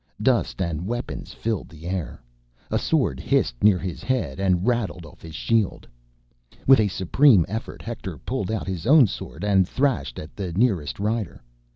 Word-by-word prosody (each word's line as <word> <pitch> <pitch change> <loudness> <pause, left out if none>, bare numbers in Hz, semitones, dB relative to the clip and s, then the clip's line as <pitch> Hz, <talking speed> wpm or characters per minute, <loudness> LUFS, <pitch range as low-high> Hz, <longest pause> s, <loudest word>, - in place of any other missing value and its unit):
Dust 115 -4 +1
and 85 0 -3
weapons 120 +2 -4
filled 110 -3 -3
the 80 0 -13
air. 90 -8 -4 0.5
A - - +2
sword 65 - +1
hissed - - 0
near 105 -3 +6
his 90 -1 -5
head 125 - -1
and 95 -2 +1
rattled 115 -8 -1
off 75 - -15
his 80 -2 -10
shield. 110 +3 0 0.8
With 135 -2 +7
a 105 - +3
supreme 100 - +4
effort, 110 +4 -6
Hector 105 -7 -6
pulled 115 - -3
out 110 - -2
his 95 -2 -4
own 145 -1 +8
sword 100 - -6
and 95 -3 +3
thrashed 135 -3 0
at 75 - -9
the 95 -4 -4
nearest 95 - +1
rider. 105 - -2
100 Hz, 170 wpm, -24 LUFS, 85-115 Hz, 0.8 s, own